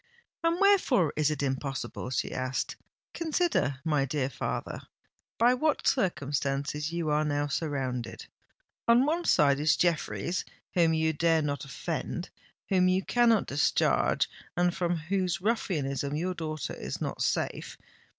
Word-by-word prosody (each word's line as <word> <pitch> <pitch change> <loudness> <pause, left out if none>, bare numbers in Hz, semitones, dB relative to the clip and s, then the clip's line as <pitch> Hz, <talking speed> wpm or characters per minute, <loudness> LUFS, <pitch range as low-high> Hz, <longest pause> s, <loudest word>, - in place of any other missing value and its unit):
"And 335 +1 +2
wherefore 330 - +4
is 150 -1 +2
it 150 -2 -2
impossible?" 135 -2 -3
she 130 - -2
asked. 130 +1 -2 0.4
"Consider, 320 - 0
my 150 -3 +2
dear 135 -1 -1
father, - - -4 0.6
by 240 +2 +5
what 300 +4 0
circumstances 145 - 0
you 170 -2 -1
are 150 +1 +2
now 145 -1 0
surrounded. 135 -5 -3 0.6
On 235 +3 +6
one 335 +4 0
side 140 -1 +4
is 150 0 +3
Jeffreys 165 - 0 0.3
whom 165 -2 +3
you 160 0 +1
dare 160 +1 +2
not 145 -2 -2
offend—whom 180 +6 -3
you 185 +1 +2
cannot 235 -3 +3
discharge—and 175 +4 +1
from 175 -1 0
whose 180 +2 -1
ruffianism 145 - -1
your 180 +4 -1
daughter 155 -3 -4
is 65 +2 -5
not - - -4
safe. - - -1
155 Hz, 130 wpm, -29 LUFS, 140-185 Hz, 0.6 s, On